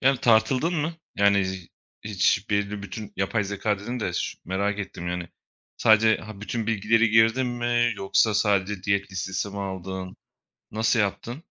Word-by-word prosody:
Yani, 135 -1 +3
tartıldın 125 +7 +3
mı? 160 +1 -1 0.2
Yani, 100 -1 +4
z 95 -2 -6 0.4
hiç 100 0 +1
belli 100 0 -1
bütün 105 +1 -7
yapay 100 +2 0
zekâ 100 +1 -1
dedin 120 +5 -5
de, 90 - -2
şi 85 - -3
merak 100 +3 -1
ettim, 90 -3 -5
yani. 90 -1 -4 0.5
Sadece 110 0 +5
Ha, 105 -2 -10
bütün 110 +1 -3
bilgileri 115 +1 +2
girdin 115 +3 +4
mi 120 -1 +1
yoksa 100 +3 +2
sadece 100 -2 +1
diyet 100 0 -1
listesi 95 +1 -3
mi 100 - -7
aldın? 95 -1 -5 0.5
Nasıl 110 +2 +1
yaptın? 120 - -3
105 Hz, 155 wpm, -25 LUFS, 95-115 Hz, 0.5 s, Sadece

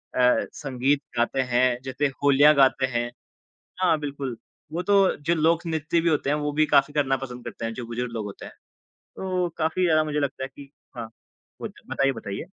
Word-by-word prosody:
अ, 125 -1 +3
संगीत 135 0 0 0.2
गाते 120 +3 +1
हैं, 125 -1 +2
जैसे 130 +2 -1 0.2
होलिया 145 +2 +6
गाते 130 0 +3
हैं। 120 -2 -2 0.7
हाँ, 170 -4 +3
बिल्कुल। 140 -4 -4 0.4
वो 170 +2 -2
तो 195 0 +3
जो 160 +4 0
लोक 165 +1 +2
नृत्य 160 0 0
भी 170 - +1
होते 150 -3 +1
हैं 145 - +2
वो 150 0 -2
भी 155 - +5
काफ़ी 140 0 +3
करना 135 -3 +2
पसंद 125 -2 -8
करते - - -7
हैं, 115 - -2
जो 120 0 -6
बुजुर्ग 120 +1 -4
लोग 110 -2 -3
होते 100 - -9
हैं। - - -10 0.7
तो 185 -2 -1
काफ़ी 160 +3 0
ज़्यादा 155 -2 +4
मुझे 150 -1 -1
लगता 135 -2 -2
है 130 - -4
कि 140 -1 -12 0.3
हाँ, 115 -2 -5 0.5
होत - - -5 0.2
बताइए, 135 0 +2
बताइए। 105 +1 -6
140 Hz, 195 wpm, -25 LUFS, 125-155 Hz, 0.7 s, होलिया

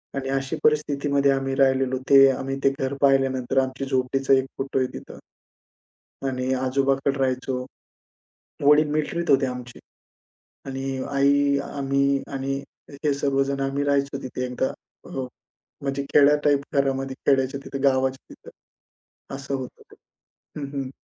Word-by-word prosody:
आणि 135 -1 -3
अशी 135 0 -1
परिस्थितीमध्ये 140 -2 +2
आम्ही 135 0 -1
राहिलेलो. 130 -1 +2
ते 135 -1 +8
आम्ही 135 +1 -3
ते 135 - +6
घर 135 +1 -1
पाहिल्यानंतर, 135 -2 +2
आमच्या 130 +1 -5
झोपडीचा 135 +1 +1
एक 130 -1 +3
फोटो 135 0 -1
आहे 130 - +1
तिथं. - - -10 1.1
आणि 130 0 -1
आजोबांकडे 135 +1 0
राहायचो. 130 -1 -1 1.0
वडील 150 +1 +5
मिलक्ट्रीत 170 +3 -2
होते 135 -1 +4
आमचे. 125 -1 -7 0.9
आणि 135 0 -5 0.3
आई, 140 0 +3
आम्ही 140 0 +1
आणि 135 0 -2 0.5
हे 145 - +3
सर्वजण 140 0 0
आम्ही 135 +1 -1
राहायचो 140 -1 0
तिथे 125 0 -4
एकदा. 125 +1 -2 0.3
हो. 130 -1 -4 0.6
म्हणजे 140 0 -2
खेड्या 145 0 +6
टाइप 145 -1 +3
घरामध्ये, 135 -1 0
खेड्याच्या 135 0 +2
तिथे, 135 - -5
गावाच्या 130 -1 0
तिथं. - - -14 0.9
असं 135 0 -4
होतं 130 -2 -7
ते. - - -15 0.7
हं, 140 - -4
हं. 135 -2 -4
135 Hz, 135 wpm, -24 LUFS, 130-140 Hz, 1.1 s, ते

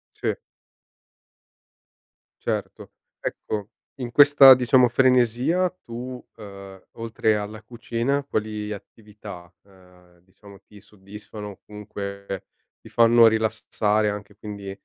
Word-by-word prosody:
Sì. - - -1 2.1
Certo, - - -4 0.3
ecco 105 -1 -4 0.3
in 120 -1 -4
questa 145 -1 +9
diciamo 125 0 +4
frenesia 125 +7 +2 0.2
tu, 125 +2 -8
uhm, 100 -3 -11
oltre 110 -1 -1
alla 105 +1 -6
cucina 120 +4 -2
quali 105 -4 -3
attività, 105 -4 -11
uhm, 90 -2 -22
diciamo 100 +2 -17
ti 105 -1 -17
soddisfano, 105 +1 -11
comunque 100 -2 -7 0.3
ti - - -14
fanno 115 0 +6
rilassare 110 -1 +1
anche 105 -1 -6
quindi 100 -2 -8
105 Hz, 95 wpm, -24 LUFS, 100-120 Hz, 2.1 s, questa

